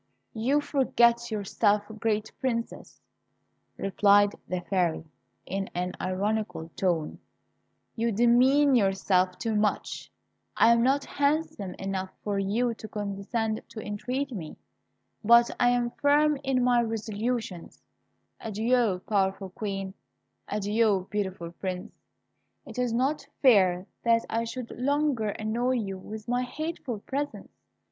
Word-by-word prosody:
"You 265 +7 +1
forget 235 -4 +2
yourself, 205 0 +1 0.2
great 215 -1 -1
Princess," 235 -3 -3 0.8
replied 205 +1 +4 0.2
the 180 -1 -2
Fairy, 175 -3 0 0.4
in 195 0 -3
an 180 +1 -2
ironical 195 -2 -2
tone, 170 -4 -1 0.8
"you 230 0 0
demean 250 +6 +4
yourself 190 -4 +2
too 225 -2 -2
much. 210 0 -1 0.5
I 230 - +6
am 235 0 +4
not 275 +3 +2
handsome 280 - -1
enough 190 -1 -3
for 205 -1 -1
you 225 +5 0
to 220 - -9
condescend 210 +2 -3
to 230 -1 -8
entreat 250 +7 -3
me; 175 -10 -7 0.7
but 235 +2 +6
I 245 - +5
am 245 -1 +1
firm 295 +2 +3
in 265 -2 +1
my 245 -1 +4
resolutions. 220 -3 -3 0.6
Adieu, 225 -2 +1
powerful 195 -2 0
Queen; 195 -1 -4 0.5
adieu, 210 -2 +1
beautiful 190 -5 -3
Prince; 180 +1 -5 0.7
it - - -8
is 250 -2 +1
not 270 +5 0 0.2
fair 185 -8 +5 0.2
that 230 -1 +3
I 230 +1 0
should 230 +1 -6
longer 280 -4 0
annoy 225 +5 -1
you 195 -6 -3
with 215 +3 -9
my 245 +1 +1
hateful 255 -3 -4
presence. 285 +5 -4
220 Hz, 120 wpm, -27 LUFS, 195-245 Hz, 0.8 s, I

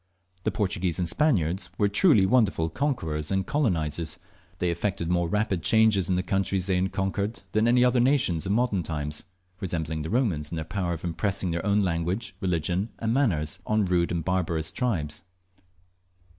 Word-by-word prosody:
The - - +3
Portuguese 95 -5 -1
and 90 - -1
Spaniards 90 - +1
were 105 - +3
truly 100 - +4
wonderful 95 -8 +2
conquerors 80 - -2
and 95 -1 0
colonizers. 85 - 0 0.4
They 90 -1 0
effected 85 -1 -2
more 85 -1 +1
rapid 105 -2 0
changes 100 0 +3
in 90 - +2
the 90 - 0
countries 95 0 0
they 95 -2 +1
conquered 100 +3 -2
than 110 +2 +2
any 125 +1 +5
other 125 0 +3
nations 120 - +2
of - - 0
modern 115 -4 +1
times, 75 -2 -4 0.3
resembling 80 -4 -2
the 80 - -4
Romans 95 - 0
in - - -3
their 80 -1 -3
power 90 0 -2
of 80 - -7
impressing 90 +2 -1
their 85 0 -2
own 100 +1 +2
language, 90 +4 -2
religion, 90 +3 0
and 115 0 -1
manners 90 - 0
on 110 -1 +2
rode 90 -2 +1
and 85 -2 -2
barbarous 85 -3 0
tribes. 85 - -1
95 Hz, 170 wpm, -26 LUFS, 85-105 Hz, 0.4 s, any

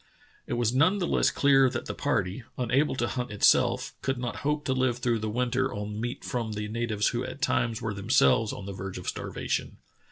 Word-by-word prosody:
It - - -3
was 120 -1 +1
none 160 +10 +4
the 185 - 0
less - - +2
clear 135 -2 +4
that - - -4
the - - -4
party, 115 -6 -1 0.2
unable 130 +4 +1
to 120 -2 0
hunt 125 0 -3
itself, 105 -1 +3
could 135 -1 -1
not 120 -1 -4
hope 150 +1 -1
to 130 - +1
live 130 -2 +1
through 120 -2 0
the 110 0 -3
winter 125 +3 0
on 105 +1 -5
meat 120 +1 -4
from 115 -3 -3
the 105 0 -3
natives 110 -1 0
who 120 +1 -2
at 135 - -7
times 115 -3 0
were 110 - -2
themselves 110 +1 +3
on 100 - -7
the 100 - -5
verge 95 0 -6
of - - -8
starvation. - - -3
120 Hz, 215 wpm, -28 LUFS, 105-130 Hz, 0.2 s, none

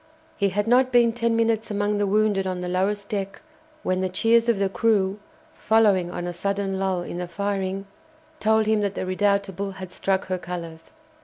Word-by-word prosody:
He 200 -1 +1
had 205 +2 -1
not 250 +2 +3
been 240 -2 +4
ten 235 -1 0
minutes 225 -1 +1
among 205 0 0
the 205 - +1
wounded 205 -1 +2
on 185 -1 -3
the 180 - -3
lowest 200 +3 -1
deck 195 -3 -4 0.4
when 185 0 0
the 185 - 0
cheers 230 +5 +3
of 230 - +3
the 195 0 +1
crew, 200 -1 +1 0.3
following 205 -5 +3
on 175 0 -5
a 175 - -4
sudden 195 +1 -2
lull 190 -2 0
in 175 - -6
the 180 - -4
firing, 195 +1 -3 0.5
told 220 0 +3
him 215 0 +2
that 200 -1 -1
the - - -3
"Redoutable" 200 0 0
had 185 -2 -8
struck 195 0 -1
her 185 -1 -2
colours. 170 -2 -7
200 Hz, 190 wpm, -24 LUFS, 185-215 Hz, 0.5 s, been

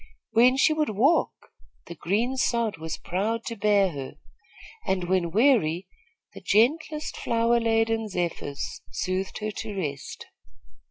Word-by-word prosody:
When 245 +3 +5
she 310 - +4
would 310 -1 0
walk, 255 - +1 0.3
the - - -8
green 220 +10 -1
sod 235 -6 0
was 160 0 -5
proud 220 +6 -2
to 230 - -4
bear 200 -2 +3
her, 135 -3 -7 0.7
and, 190 -1 0
when 175 -1 +1
weary, 190 - +3 0.5
the - - -10
gentlest 300 +8 +1
flower 235 +1 +1
laden 225 -1 +1
zephyrs 170 -6 -4
soothed 185 +1 -2
her 215 0 -2
to 205 0 -6
rest. 145 -6 -5
215 Hz, 130 wpm, -26 LUFS, 185-235 Hz, 0.7 s, When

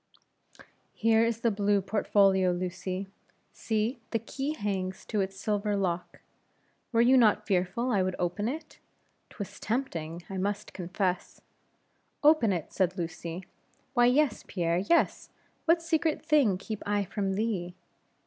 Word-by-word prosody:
"Here 225 0 +4
is 230 0 0
the 230 - +2
blue 205 0 +2
portfolio, 195 -1 +3
Lucy. 185 +2 -3 0.5
See, 225 +3 -1
the 230 - +1
key 270 +6 -4
hangs 190 -5 -3
to 210 -3 0
its 195 0 -4
silver 210 0 0
lock; 180 -3 -2 0.7
were 230 -1 +4
you 255 +3 +6
not 215 -3 +4
fearful 195 +6 0
I 200 -4 +3
would 185 0 -1
open 180 +4 -1
it? 305 +3 -7 0.5
'twas 205 -4 -8
tempting, 175 - -3
I 195 - -5
must 205 +2 -2
confess." 180 0 -2 0.8
"Open 295 -8 +5
it!" 175 -5 -3
said 185 0 +1
Lucy 170 +1 -5 0.5
"why, 245 -2 +5
yes, 265 -1 +2
Pierre, 170 -2 0
yes; 335 - +1 0.4
what 330 0 +3
secret 320 -1 0
thing 285 - +4
keep 210 +2 -6
I 205 0 0
from 195 0 -2
thee? 190 -4 -2
205 Hz, 140 wpm, -29 LUFS, 185-230 Hz, 0.8 s, you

